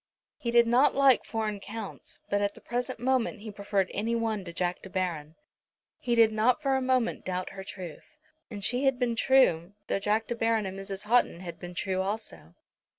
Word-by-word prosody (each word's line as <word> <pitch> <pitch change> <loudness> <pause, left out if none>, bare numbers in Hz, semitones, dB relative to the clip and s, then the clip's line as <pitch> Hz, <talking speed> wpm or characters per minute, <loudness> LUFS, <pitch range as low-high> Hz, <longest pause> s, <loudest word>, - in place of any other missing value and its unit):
He 235 - -3
did 235 0 +5
not 245 +5 +4
like 275 -2 +5
foreign 215 -2 -3
Counts, 215 +1 -8
but 205 0 +2
at 205 0 0
the - - -13
present 245 +1 -3
moment 250 -3 0
he 215 0 -7
preferred 200 -2 -1
any 225 +4 -1
one 225 -3 -1
to 170 - -6
Jack 175 +1 -2
De 190 - -10
Baron. 170 -5 -3 0.6
He 240 -1 0
did 225 -1 +6
not 220 +3 +2
for 270 -1 +1
a 265 - +1
moment 255 -2 +1
doubt 185 0 -3
her 195 -1 -8
truth. 185 - -9 0.3
And 205 -4 -7
she 250 +6 +1
had 270 -2 +3
been 245 -2 0
true, 205 -9 +3
though - - -1
Jack 210 +2 +1
De 240 - -2
Baron 225 -2 +1
and 190 0 -5
Mrs. 195 0 -5
Houghton 215 -5 +2
had 170 -2 -8
been 175 0 -8
true 190 +1 -1
also. 190 - -5
215 Hz, 205 wpm, -28 LUFS, 190-240 Hz, 0.6 s, did